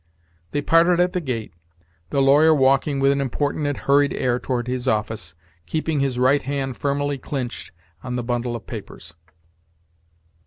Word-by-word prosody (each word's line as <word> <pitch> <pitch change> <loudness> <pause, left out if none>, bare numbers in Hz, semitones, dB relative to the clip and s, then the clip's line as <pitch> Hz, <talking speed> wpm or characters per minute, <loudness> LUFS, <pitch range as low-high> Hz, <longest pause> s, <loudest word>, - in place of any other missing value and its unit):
They 145 0 -2
parted 170 +3 +4
at 180 0 +2
the 180 - -1
gate, 115 - -4 0.6
the 135 - +1
lawyer 150 +4 +5
walking 135 +1 +2
with 135 0 +4
an 140 0 0
important 145 +3 -1
and 145 - -2
hurried 140 0 +2
air 125 -1 0
toward 125 -1 -2
his 125 0 -3
office, 105 -7 -2 0.3
keeping 160 -1 -1
his 135 -3 0
right 130 +3 +3
hand 135 -1 -3
firmly 145 +1 -1
clinched 130 -3 -5 0.3
on 125 -1 -4
the 125 - -2
bundle 120 0 -2
of 115 - -8
papers. 100 -7 -9
135 Hz, 160 wpm, -22 LUFS, 125-145 Hz, 0.6 s, lawyer